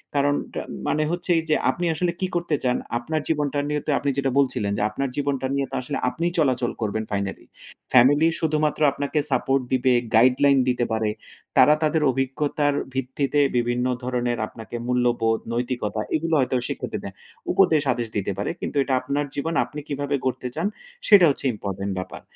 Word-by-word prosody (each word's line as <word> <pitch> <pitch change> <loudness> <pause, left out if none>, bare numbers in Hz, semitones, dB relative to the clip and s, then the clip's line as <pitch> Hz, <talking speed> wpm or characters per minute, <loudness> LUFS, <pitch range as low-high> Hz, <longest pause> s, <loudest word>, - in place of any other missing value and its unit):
কারণটা 145 0 0 0.3
মানে 155 - +1
হচ্ছে 175 +1 -2
এইযে, 155 -1 0
আপনি 175 - -1
আসলে 175 +2 0
কি 185 - 0
করতে 170 -3 0
চান? 125 -1 +2 0.2
আপনার 155 +6 -2
জীবনটা 145 -2 0
নিয়ে 150 0 -1
তো - - -4
আপনি 140 - -1
যেটা 135 -1 +1
বলছিলেন 125 -7 +1
যে, - - -1
আপনার 135 +5 -2
জীবনটা 140 -2 -1
নিয়ে 140 -1 0
তো - - -4
আসলে 125 - -4
আপনিই 170 +5 -2
চলাচল 130 -5 +1
করবেন 110 0 -1
ফাইনালি। 100 -1 -3 0.5
ফ্যামিলি 145 +6 +6
শুধুমাত্র 155 -1 0
আপনাকে 140 +2 -2
সাপোর্ট 135 0 +2
দিবে, 130 0 +3 0.2
গাইডলাইন 130 +4 +5
দিতে 120 -1 +1
পারে। 110 -1 0 0.5
তারা 150 - +7
তাদের 155 +1 +2
অভিজ্ঞতার 140 +3 0 0.2
ভিত্তিতে 135 +2 -1 0.2
বিভিন্ন 120 +1 0 0.2
ধরনের 120 -1 -1
আপনাকে 115 +1 -10
মূল্যবোধ, 120 -2 +1
নৈতিকতা 120 -3 -2
এগুলো 165 +1 -1
হয়তো 130 0 +1
শিক্ষা - - -4
দেবে, - - -4 0.4
উপদেশ 165 -6 +4
আদেশ 120 -1 -3
দিতে 100 0 -1
পারে। 100 - -2
কিন্তু - - -5
এইটা 135 - -1
আপনার 140 +2 -1
জীবন, 160 +4 -2
আপনি 150 - -8
কিভাবে 145 0 -2
গড়তে 125 0 -1
চান 165 +5 0 0.4
সেটা 200 -5 +8
হচ্ছে 140 - -3
ইম্পোর্টেন্ট 100 -1 -4
ব্যাপার। 95 - -6
135 Hz, 170 wpm, -24 LUFS, 120-150 Hz, 0.5 s, সেটা